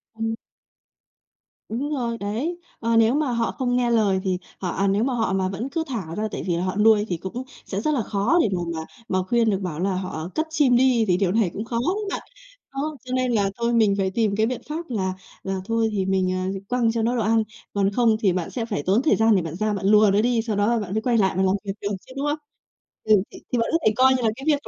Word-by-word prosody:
Ừm. 225 0 -2 1.3
Đúng 260 +7 -2
rồi, 235 -4 -2
đấy. 230 - -3 0.2
Ờ, 230 0 0
nếu 225 +1 +5
mà 295 -3 +1
họ 235 -1 0
không 245 -2 -1
nghe 240 -1 +1
lời 205 -5 +3
thì 185 -2 0 0.2
họ, 185 - -2
à 195 +3 0
nếu 200 +3 +2
mà 260 +1 0
họ 225 -5 0
mà 190 -1 0
vẫn 215 +8 -4
cứ 325 +2 -1
thả 195 - -4
ra 215 +3 -1
tại - - -4
vì 175 - +1
là 175 - -1
họ 185 0 -2
nuôi 210 0 +4
thì 175 - -1
cũng 190 +9 -5 0.2
sẽ 195 +1 -3
rất 305 +6 +1
là 265 - +1
khó 210 - +1
để - - +2
mà 175 - -2
mà 160 -1 -5 0.2
mà 185 -1 +1
khuyên 235 +1 +3
được, 195 -3 +1
bảo 170 -5 -4
là 190 +1 0
họ 180 -3 -4
cất 315 +1 0
chim 290 -5 +3
đi 245 -2 +4
thì 180 -1 +3
điều 185 -2 +1
này 215 -2 +2
cũng 210 - -4
khó 230 0 -3
lắm 370 - +2
bạn,. - - -3 0.5
Đó, 295 +3 -3
cho 255 - -5
nên 255 -1 +1
là 205 -4 +2
thôi 235 0 0
mình 215 -4 +4
phải 190 -1 0
tìm 210 -1 +1
cái 220 - +2
biện 240 0 -3
pháp 330 +3 -5
là 190 -6 -1 0.3
là 190 0 -2
thôi 225 0 +1
thì 195 -2 -1
mình, 190 -1 +1
ờ, 185 +1 -2
quăng 240 -2 +2
cho 230 - -1
nó 235 +3 +1
đồ 235 - 0
ăn, 220 +1 +3 0.3
còn 200 0 +1
không 230 0 +3
thì 195 -5 +2
bạn 175 -2 -2
sẽ 235 -3 -3
phải 205 -10 -3
tốn 195 +6 +3
thời 305 - +3
gian 225 -1 +4
để 185 - +3
bạn 165 0 -5
ra 215 +2 0
bạn 195 -1 -3
lùa 210 0 +6
nó 205 - +4
đi, 235 0 +2
sau 220 -2 -2
đó 220 +3 +2
bạn 195 -3 -5
mới 220 - 0
quay 235 0 +1
lại 190 -3 +3
và 190 - +3
làm 190 +1 +3
việc 195 - -2
được 200 - -2 0.2
chứ, 255 - -13
đúng 280 - -1
không? 295 +1 0 0.7
Ừ, 210 -3 +4
thì - - -11
thì - - +3
bạn 230 - +1
có 330 - +4
thể 215 - +4
coi 260 +2 +5
như 255 - 0
là 225 - +3
cái 265 - -10
việc 290 -2 +1
220 Hz, 275 wpm, -23 LUFS, 195-245 Hz, 1.3 s, lùa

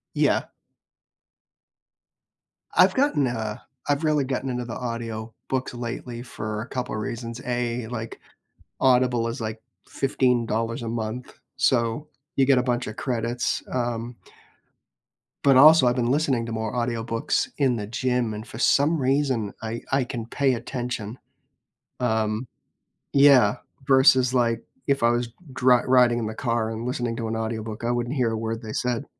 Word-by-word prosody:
Yeah. - - +3 2.3
I've - - +5
gotten, 265 - +2
uh, 110 -2 -3 0.3
I've 145 +2 +1
really 150 -3 +2
gotten 130 0 -2
into 125 -1 -2
the 115 - -6
audiobooks 115 +1 -4
lately 120 0 -5
for 110 -3 -5
a 120 - -9
couple 125 -3 -3
reasons. 115 +2 -5
A, 120 -1 -2
like, 115 -2 -6 0.6
Audible 125 -2 +3
is, 115 0 -4
like, 110 0 -4 0.3
$15 120 -4 0
a - - -4
month, 115 +2 -4 0.2
so 130 +1 +1 0.3
you 135 - +4
get 135 -1 +4
a 125 - +2
buncha 120 -3 -2
credits, 120 -1 -1
um 120 -1 -2 1.3
but 135 -2 +6
also 155 0 +8
I've 120 +1 +2
been 120 -1 +1
listening 135 -5 +1
to 115 - -5
more 110 -1 -3
audiobooks 115 -2 -1
in 135 -4 +2
the 105 -2 -4
gym, 125 +1 -1
and 110 +2 -7
for 115 - -9
some 145 +5 +3
reason 130 -5 +1
I 115 +1 -4
I 135 -1 +3
can 120 -3 -5
pay 135 +2 +1
attention. 120 -2 -5 0.8
Um 110 -1 0 0.7
yeah, 140 -7 +6 0.3
versus, 130 -2 +5
like, 115 -2 +1 0.2
if 140 -3 +1
I 115 - +5
was 120 0 0 0.2
dri 125 -1 +4
riding 125 -2 +4
in 115 - -2
the 110 - -4
car 115 -1 -1
and 115 +1 -5
listening 120 -2 -2
to 115 -1 -3
an 110 - -2
audiobook, 110 -1 -4
I 120 - 0
wouldn't 120 +2 -1
hear 120 -3 +2
a 110 - -1
word 115 0 -3
they 110 -1 -6
said. 125 +2 -1
120 Hz, 150 wpm, -25 LUFS, 115-130 Hz, 2.3 s, also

